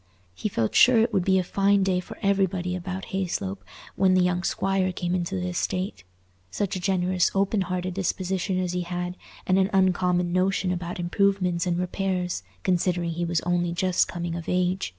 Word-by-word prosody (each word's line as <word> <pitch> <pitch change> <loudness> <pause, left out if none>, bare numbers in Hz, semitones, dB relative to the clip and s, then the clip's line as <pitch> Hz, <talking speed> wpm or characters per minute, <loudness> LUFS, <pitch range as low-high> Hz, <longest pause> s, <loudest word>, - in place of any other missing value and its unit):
He 210 - -3
felt 115 - -1
sure 250 -1 +6
it 225 +1 +2
would 190 -3 +2
be 190 +1 +3
a 185 - +2
fine 200 +2 +2
day 185 -1 +1
for 180 - -9
everybody 190 -2 +1
about 185 +1 -5
Hayslope 135 - -2 0.4
when 185 0 +3
the 185 - +4
young 180 0 +1
squire 190 0 0
came 175 0 -3
into 185 +1 -1
the 180 -1 -2
estate—such 95 - -4
a - - -2
generous 185 -1 +1
open 195 +1 +2
hearted 185 0 -2
disposition 190 0 -1
as 180 -1 -1
he 180 - -1
had, 175 0 -4 0.3
and 185 +1 +3
an 190 0 +2
"uncommon" 180 -2 +2
notion 185 0 +1
about 175 0 -4
improvements 180 -1 +1
and 175 -1 +1
repairs, 180 - -2 0.2
considering 175 -1 +1
he 170 +1 -2
was 170 -1 0
only 175 0 0
just 180 +1 +2
coming 175 -1 -4
of 170 -1 -5
age. 180 +1 0
180 Hz, 180 wpm, -25 LUFS, 175-190 Hz, 0.4 s, sure